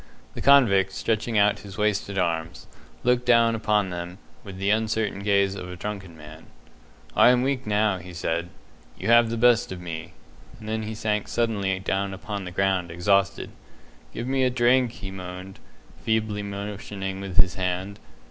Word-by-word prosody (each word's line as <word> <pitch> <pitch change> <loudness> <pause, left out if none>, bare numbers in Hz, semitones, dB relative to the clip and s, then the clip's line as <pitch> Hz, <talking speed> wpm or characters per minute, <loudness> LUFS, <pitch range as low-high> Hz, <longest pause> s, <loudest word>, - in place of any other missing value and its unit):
The - - -7
convict, 100 -9 +5
stretching 110 0 -1
out 105 0 +3
his 100 -3 -11
wasted 105 -1 0
arms, 85 -2 -2 0.4
looked 125 0 +2
down 115 -1 +5
upon 105 -3 +1
them 90 +1 -6 0.3
with 95 -3 -9
the 100 +2 +1
uncertain 110 -1 0
gaze 100 -1 +2
of 90 -2 -7
a 90 - -7
drunken 95 -3 -6
man. 75 +1 -13 0.7
"I - - +7
am 125 0 +4
weak 130 -3 -1
now," 105 -2 +1
he 90 +1 -10
said. 85 0 -2 0.5
"You 100 - -3
have 120 0 +6
the 115 - -2
best 120 -1 +4
of 95 - -6
me"; 85 -2 -7 0.5
and 110 - -10
then 110 0 -2
he 110 0 -5
sank 105 -1 -1
suddenly 100 -5 0
down 95 +1 -2
upon 100 -1 -6
the 90 - -6
ground, 95 -1 0
exhausted. 100 +3 +1 0.6
"Give 115 - -5
me 135 +1 +1
a 130 - +3
drink," 125 0 +3
he 95 -4 -8
moaned, 90 0 -8 0.4
feebly 110 -2 0
motioning 100 -1 -5
with 95 -2 -6
his 90 0 +5
hand. 95 +2 -3
100 Hz, 170 wpm, -25 LUFS, 95-110 Hz, 0.7 s, I